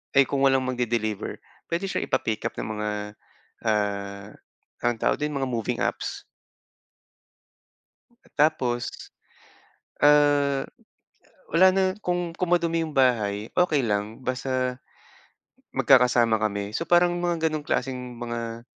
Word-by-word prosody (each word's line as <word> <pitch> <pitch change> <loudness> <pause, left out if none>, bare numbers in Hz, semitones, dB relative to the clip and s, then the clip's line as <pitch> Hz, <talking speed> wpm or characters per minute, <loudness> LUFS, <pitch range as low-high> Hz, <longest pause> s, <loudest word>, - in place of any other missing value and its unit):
ay 135 - +8
kung 135 0 0
walang 135 -1 +3
magde-deliver, 120 -4 -2 0.3
pwede 170 +4 -2
siya - - -1
ipa-pick 110 -1 -1
up - - -1
ng 110 0 -4
mga, 105 0 -2 0.8
ah, 100 -2 -1 0.6
anong 120 -2 0
tawag - - +2
dun? 150 0 -2
Mga 135 -2 -1
moving 115 -3 -2
apps. - - -2 2.2
Tapos, 125 -6 +2 1.1
ah, 145 -2 +4 0.9
wala 180 +3 +6
na 195 - +2 0.2
kung 175 -1 -1
kung 180 -2 -2
madumi 170 -1 +2
yung 155 - -6
bahay 110 -5 +2
okey 175 -5 +3
lang, 105 +1 -2
basta 130 0 -1 1.0
magkakasama 125 -3 +4
kami. 100 0 -2
So, - - -1
parang 175 +1 +4
mga 170 -2 0
ganong 155 -1 -4
klaseng 125 -3 -3
mga 115 -1 -5
130 Hz, 120 wpm, -25 LUFS, 115-150 Hz, 2.2 s, ay